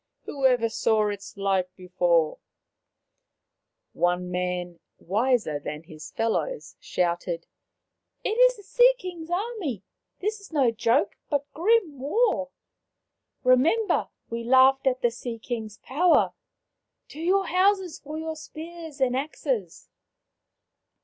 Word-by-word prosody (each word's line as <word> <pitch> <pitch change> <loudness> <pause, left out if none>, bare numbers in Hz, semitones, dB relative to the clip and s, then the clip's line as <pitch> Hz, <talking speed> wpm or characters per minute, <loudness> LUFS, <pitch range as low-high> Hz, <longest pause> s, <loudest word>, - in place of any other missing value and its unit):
" - - -56
Whoever 255 -4 +2
saw 220 -1 +1
its 205 0 -7
like 190 -2 0
before? 175 -3 +1 0.8
" - - -53 0.6
One 180 +1 0
man, 180 -1 -3 0.2
wiser 210 - 0
than 150 +2 -6
his 160 -2 -11
fellows, 230 - -2
shouted, 175 -1 -2 0.8
"It - - 0
is - - +4
the 410 - -13
Sea - - +5
king's 350 -7 -7
army. 355 - -3 0.4
This 425 +2 -2
is 400 - -14
no 275 -6 +3
joke, 230 +4 +1
but 285 -2 0
grim 355 - +2
war. 290 - +1 0.9
Remember, 320 - +3 0.2
we 230 0 -4
laughed 265 +2 +5
at 255 -1 +1
the 240 - +3
Sea 240 -1 -6
king's 220 -2 -5
power. 330 - +2 0.8
To 300 - -11
your 380 +4 +2
houses 370 0 +2
for 300 +2 -7
your 320 0 -4
spears 320 0 -9
and 255 -2 +2
axes 260 - -3
260 Hz, 125 wpm, -26 LUFS, -, 0.9 s, Sea